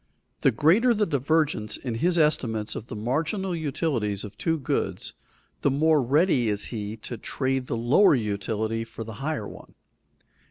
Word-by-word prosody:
_ - - -42
The - - +5
greater 180 - +4
the 210 0 +2
divergence 145 - 0
in 125 -3 -4
his 175 +10 +1
estimates 115 -9 +1
of 110 - -6
the - - -7
marginal 160 - -1
utilities 135 - -1
of 105 -1 -8
two 165 +10 0
goods, 135 - -2 0.5
the - - +3
more 155 +2 +3
ready 135 - +2
is 105 -1 -1
he 105 -1 -4
to 120 - -5
trade 130 0 -2
the 115 - -2
lower 135 - +5
utility 110 0 -2
for 115 0 -8
the 110 0 -8
higher 140 -8 -2
one. - - -13
130 Hz, 165 wpm, -26 LUFS, 110-160 Hz, 0.5 s, The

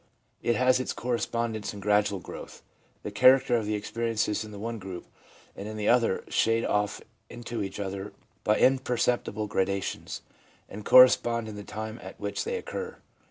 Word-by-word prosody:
It 120 - +1
has 130 0 +4
its 130 - -2
correspondence 115 -3 -2
in - - -7
gradual 105 0 +2
growth. 90 - -10 0.4
The - - -5
character 130 +4 +5
of 110 -3 0
the 105 - 0
experiences 110 0 -1
in 110 - -9
the 105 - -9
one 115 +2 -4
group 95 -2 -7 0.5
and 100 - -7
in 110 0 -6
the 105 - 0
other 120 -5 +3
shade 115 +1 +2
off 105 0 0 0.3
into 120 -1 -5
each 95 0 -5
other 100 0 -4 0.3
by 105 - +3
imperceptible 125 -4 +1
gradations, 100 -1 -2 0.4
and 105 +1 -9
correspond 120 -2 +6
in 110 - -7
the 105 - -7
time 110 +2 -6
at 95 - -10
which 100 0 -3
they 470 +1 -2
occur. 465 0 -6
110 Hz, 165 wpm, -28 LUFS, 105-120 Hz, 0.5 s, correspond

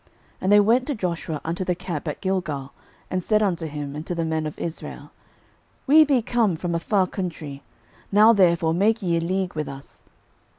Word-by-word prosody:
06:009:006 - - -32 0.3
And 190 - +1
they 205 - +8
went 235 +5 +3
to 290 - -1
Joshua 170 -6 -3
unto 170 +4 -2
the 180 -1 -1
camp 170 -3 -5
at 150 - -4
Gilgal, 165 -8 -2 0.4
and 185 - 0
said 215 +3 +2
unto 175 -5 -1
him, 145 -1 -6
and 150 - -5
to 175 - -2
the 165 -1 -1
men 160 -1 -1
of 150 - -8
Israel, 165 -1 -6 0.7
We 310 +3 +7
be 270 -5 +2
come 225 -6 +1
from 170 +1 -3
a 170 - 0
far 190 +2 +1
country: 160 -7 -6 0.5
now 215 +3 +7
therefore 170 -5 +3
make 215 +5 +2
ye 170 -2 +1
a - - 0
league 185 +2 -1
with 155 -2 -3
us. 140 0 -11
175 Hz, 205 wpm, -24 LUFS, 160-205 Hz, 0.7 s, they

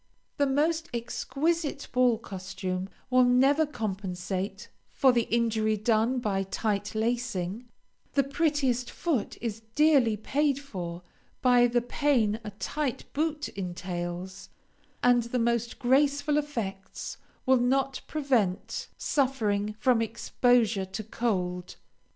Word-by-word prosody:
The 285 -2 +3
most 315 +4 +1
exquisite 285 +6 -1
ball 250 -2 +4
costume 190 -2 -5 0.2
will 255 0 +6
never 270 +5 +4
compensate 195 -3 -4 0.2
for 265 - +4
the 235 -2 +1
injury 220 -2 +1
done 225 +4 +2
by 205 -5 0
tight 205 +1 -2
lacing, 230 -2 -2 0.4
the 275 - +4
prettiest 275 -4 0
foot 295 - -2
is 225 -2 -3
dearly 280 -8 +4
paid 280 +6 +1
for 180 -10 -6 0.4
by 245 -1 +6
the 240 0 +1
pain 245 -5 +1
a 215 - -5
tight 255 +6 -4
boot 305 0 -1
entails, 180 0 -5 0.5
and 245 -1 +5
the 235 +2 -2
most 235 -1 0
graceful 285 +3 +3
effects 210 -10 -5 0.3
will 260 -1 +5
not 265 +2 +1
prevent 250 -11 0
suffering 215 -7 0
from 240 0 +3
exposure 230 -2 +2
to 190 +3 -6
cold. 180 -5 -2
235 Hz, 115 wpm, -28 LUFS, 200-270 Hz, 0.5 s, will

